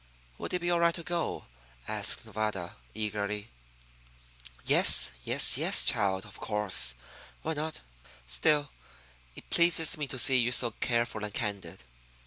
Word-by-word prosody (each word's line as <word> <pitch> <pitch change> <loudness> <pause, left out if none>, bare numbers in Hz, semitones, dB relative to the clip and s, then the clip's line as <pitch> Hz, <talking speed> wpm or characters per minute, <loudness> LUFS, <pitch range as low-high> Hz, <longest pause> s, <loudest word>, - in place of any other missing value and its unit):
"Would - - -7
it 180 - -4
be 175 0 -2
all 170 - 0
right 170 0 +1
to 170 - -7
go?" 170 0 -5 0.4
asked - - -1
Nevada, 105 -5 -6 0.2
eagerly. 105 0 -5 1.2
"Yes, - - +6
yes, - - +4
yes, - - +3
child; 95 -1 +1
of 105 - -13
course. 95 - +2 0.5
Why 160 - -3
not? 155 +1 -6 0.4
Still, 140 - 0 0.6
it - - -14
pleases 170 -2 +2
me 145 - -4
to 130 - -8
see 130 +1 +5
you 120 0 0
so 120 -1 +4
careful 115 -1 -3
and 105 - -6
candid. 100 - -7
110 Hz, 140 wpm, -27 LUFS, 100-150 Hz, 1.2 s, Yes